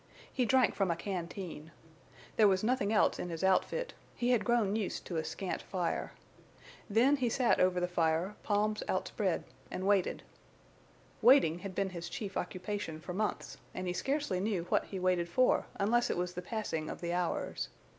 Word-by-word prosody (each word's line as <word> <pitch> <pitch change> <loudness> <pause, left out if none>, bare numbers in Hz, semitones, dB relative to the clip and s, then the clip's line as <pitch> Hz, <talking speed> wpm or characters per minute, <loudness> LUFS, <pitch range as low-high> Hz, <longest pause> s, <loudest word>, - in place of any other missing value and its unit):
He 250 - +1
drank 260 +1 +4
from 195 -3 0
a 170 - +2
canteen. 175 -3 -5 0.7
There 215 - +6
was 190 0 +2
nothing 220 -3 +1
else 215 - +3
in 180 - -3
his 165 +1 -4
outfit; 475 - +1 0.2
he 245 +1 +1
had 235 -5 +3
grown 215 -3 +2
used 215 -4 -2
to 170 - -3
a 160 - 0
scant 185 +3 -4
fire. 180 -3 -2 0.8
Then 250 +7 +4
he 250 -3 +1
sat 245 +1 +2
over 185 0 +3
the 180 - 0
fire, 170 +2 +1
palms 210 +1 +1
outspread, 185 -1 -1 0.3
and 185 - -4
waited. 200 -2 +2 1.0
Waiting 230 - +6
had 195 -1 -7
been 195 -1 0
his 170 -1 -6
chief 195 +1 -5
occupation 185 -2 -3
for 180 +3 -6
months, 210 +3 -2 0.2
and 185 - -3
he 180 - -1
scarcely 270 -1 -1
knew 195 -3 0
what - - +2
he 195 - -6
waited 180 -2 +1
for 255 +9 +3
unless 240 +4 +2
it - - 0
was 180 0 -2
the 180 - -4
passing 180 -6 -3
of - - -6
the 170 0 -2
hours. 180 -1 -2
190 Hz, 180 wpm, -32 LUFS, 180-220 Hz, 1.0 s, There